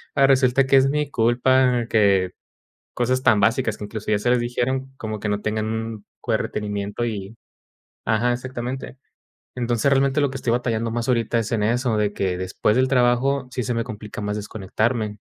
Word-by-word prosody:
ahora 135 - +5
resulta 130 0 +4
que 135 - +4
es 135 0 +4
mi 150 0 -1
culpa 125 +1 +3
que, 100 -4 +3 0.6
cosas 130 +1 0
tan 110 - +4
básicas, 110 +1 +1
que - - -6
incluso, 105 +1 -5
ya 105 - +3
se 115 +4 0
les 125 0 +3
dijeron 130 +2 -2
como 110 -1 -5
que 105 - -3
no 105 0 -1
tengan 110 0 -1
un 110 -1 -4 0.2
buen - - +2
retenimiento 105 +2 -3
y 105 -2 -5 0.7
ajá, 110 +2 +2
exactamente, 125 +1 -5 0.6
entonces, 120 +1 +1
realmente 135 +1 +3
lo 145 - +2
que 135 - -5
estoy 125 - -1
batallando 115 -2 0
más 120 0 -2
ahorita 115 -1 +1
es 110 - -3
en 110 -3 +1
eso, 120 +1 +1
de 105 -1 0
que 95 -3 -1
después 95 +3 0
del 130 0 +3
trabajo, 130 +1 +2
sí, 125 - -2
se 125 - -1
me 115 - 0
complica 105 -3 -7
más 105 0 -2
desconectarme. 105 +1 -2
115 Hz, 190 wpm, -22 LUFS, 105-130 Hz, 0.7 s, ahora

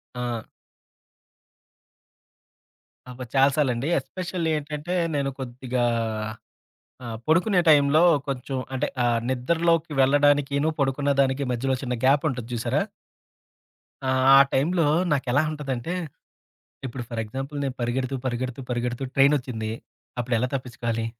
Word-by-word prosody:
ఆ! 120 -2 -4 2.6
అబ్బా! 125 0 -7
చాలా 135 +1 +5
సార్లండి. 135 -2 +1
ఎస్పెషల్లీ 170 +2 -4
ఏంటంటే 150 +3 -5 0.2
నేను 140 -1 0
కొద్దిగా 125 -1 -3 1.2
ఆహ్, 115 -1 -5
పడుకునే 180 +3 +3
టైంలో 150 +1 +5 0.3
కొంచెం 135 0 -3 0.2
అంటే 140 +3 0 0.2
ఆహ్, 120 -1 +2
నిద్రలోకి 165 +5 +1
వెళ్ళడానికిను, 145 +1 +3
పడుకున్న 140 +1 +1
దానికి 135 +1 +1
మధ్యలో 130 +2 0
చిన్న 125 -2 -2
గ్యాపుంటది 135 -3 +2
జూసారా? 120 -1 0 1.2
ఆ! - - 0 0.3
ఆ - - +9
టైంలో 165 +4 +2 0.3
నాకెలా 135 0 +2
ఉంటదంటే, 145 +1 -4 0.9
ఇప్పుడు 120 0 -6
ఫర్ 115 -2 -3
ఎగ్జాంపుల్, 135 +6 -6
నేను 135 -2 -3
పరిగెడుతూ, 130 +3 -1
పరిగెడుతూ, 125 +1 -3
పరిగెడుతూ 120 +1 -2
ట్రైనోచ్చింది. 130 -6 +2 0.5
అప్పుడెలా 120 0 0
తప్పిచ్చుకోవాలి? 120 -3 -3
135 Hz, 105 wpm, -25 LUFS, 125-145 Hz, 2.6 s, ఆ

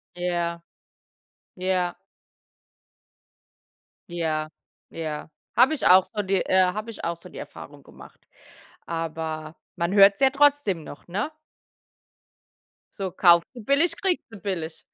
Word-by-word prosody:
Ja, 175 -1 -2 0.9
ja. 180 -1 -1 2.1
Ja, 160 -3 -2 0.4
ja. 155 -2 -5 0.3
Habe 255 +6 +5
ich 295 - -2
auch 185 +1 +7
so 210 0 -4
die, 195 0 0
äh 185 0 +4
habe 215 +3 -5
ich 225 - -8
auch 170 0 -2
so 170 - -13
die - - -11
Erfahrung - - -10
gemacht. - - -16 0.6
Aber 160 -1 -4 0.2
man 170 +2 -1
hört 200 0 +8
es - - -17
ja 270 -1 +5
trotzdem 280 - +2
noch, 145 - -12
ne? 210 - -2 1.6
So 195 -3 -3
kaufst 170 -1 +5
du 240 - -9
billig, 320 +7 +2
kriegst 375 -3 0
du 220 - -10
billig. 170 -4 -5
185 Hz, 130 wpm, -25 LUFS, 165-215 Hz, 2.1 s, hört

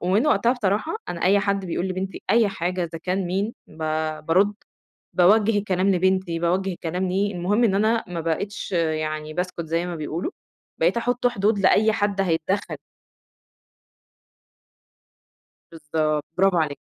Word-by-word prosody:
ومن 195 +9 +2
وقتها 240 -5 +3
بصراحة 220 - -1
أنا 170 - -4
أي 195 +2 +4
حد 200 -1 -1
بيقول 175 +1 -2
لبنتي 190 +1 -4
أي 225 -1 +4
حاجة 180 -1 -2
إذا 165 -1 -6
كان 185 +2 -2
مين، 195 +5 -1
ب - - -18 0.5
بارد 195 +5 +3 0.6
باوجه 205 +4 +4
الكلام 190 -1 0
لبنتي 185 -2 +1
باوجه 185 +3 0
الكلام 180 +2 -3
ليه، 200 +2 0
المهم 195 +7 +1
إن 205 -4 +3
أنا 220 +3 +2
ما 170 -1 -4
بقيتش 170 +5 -3
يعني 155 -2 -1
باسكُت 180 -1 -3
زي 165 +2 -1
ما 175 - -4
بيقولوا، 160 - -3 0.5
بقيت - - +2
أحط 245 +1 0
حدود 210 -2 +1
لأي 210 +3 +4
حد 205 -2 0
هيتدخّل. 185 +2 -1 3.0
بالضبط، 155 -1 -1
برافو 190 -1 +4
عليكِ. 155 -3 0
185 Hz, 140 wpm, -23 LUFS, 170-205 Hz, 3.0 s, أي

